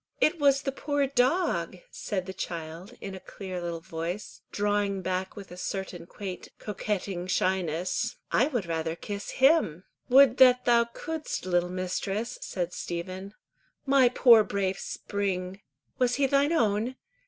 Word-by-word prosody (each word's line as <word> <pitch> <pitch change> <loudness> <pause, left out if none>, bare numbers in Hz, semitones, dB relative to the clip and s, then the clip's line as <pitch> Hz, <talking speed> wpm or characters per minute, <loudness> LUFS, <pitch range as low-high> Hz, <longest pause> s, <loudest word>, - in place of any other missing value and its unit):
"It 330 +2 +3
was 280 -1 +4
the 275 - -1
poor 285 +1 0
dog," 275 +7 +1
said 190 -4 -3
the 190 - -6
child, 170 +1 -6
in 195 - -6
a 190 - -7
clear 185 -1 -7
little 170 -1 -4
voice, 170 +3 -5
drawing 205 -2 0
back 185 +1 -2
with 200 -3 -10
a 180 - -9
certain 185 -2 -5
quaint 190 -1 -7
coquetting 195 -3 -3
shyness; 185 -2 0 0.2
"I 250 - +4
would 245 - -2
rather 165 -1 -2
kiss 200 +4 -6
him." 265 - +3 0.3
"Would 265 -1 +7
that 250 -1 +6
thou 235 -1 +5
couldst, 310 - -5
little 175 -1 +1
mistress," 185 +4 -3
said 175 -2 -3
Stephen. 185 +4 -5 0.5
"My 270 -2 +5
poor 235 -3 +7
brave 195 -2 -1
Spring!" 195 -1 -3 0.4
"Was 250 -1 +3
he 280 +1 +2
thine 280 +3 +3
own? 230 -4 +1
200 Hz, 145 wpm, -28 LUFS, 180-250 Hz, 0.5 s, Would